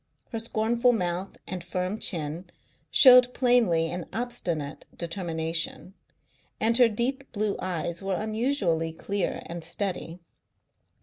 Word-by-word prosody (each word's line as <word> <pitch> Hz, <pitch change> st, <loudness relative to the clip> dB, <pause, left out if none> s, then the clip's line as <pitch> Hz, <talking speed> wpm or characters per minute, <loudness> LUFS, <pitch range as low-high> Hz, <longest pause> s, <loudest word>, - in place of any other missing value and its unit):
Her 225 Hz, -, -3 dB
scornful 230 Hz, +2 st, +2 dB
mouth 180 Hz, -2 st, -2 dB
and 180 Hz, -2 st, -5 dB
firm 185 Hz, +4 st, -3 dB
chin 165 Hz, +1 st, -1 dB, 0.4 s
showed 250 Hz, -2 st, +7 dB
plainly 225 Hz, -11 st, +3 dB
an 175 Hz, -1 st, -5 dB
obstinate 185 Hz, -11 st, -3 dB
determination, 165 Hz, 0 st, -3 dB, 0.7 s
and 230 Hz, +1 st, +3 dB
her 245 Hz, -2 st, +6 dB
deep 260 Hz, +5 st, -2 dB
blue 210 Hz, -2 st, -1 dB
eyes 170 Hz, -1 st, -3 dB
were 195 Hz, -1 st, -1 dB
unusually 215 Hz, -, 0 dB
clear 200 Hz, +3 st, -3 dB
and 170 Hz, 0 st, -6 dB
steady. 180 Hz, -3 st, -4 dB
190 Hz, 115 wpm, -27 LUFS, 170-230 Hz, 0.7 s, showed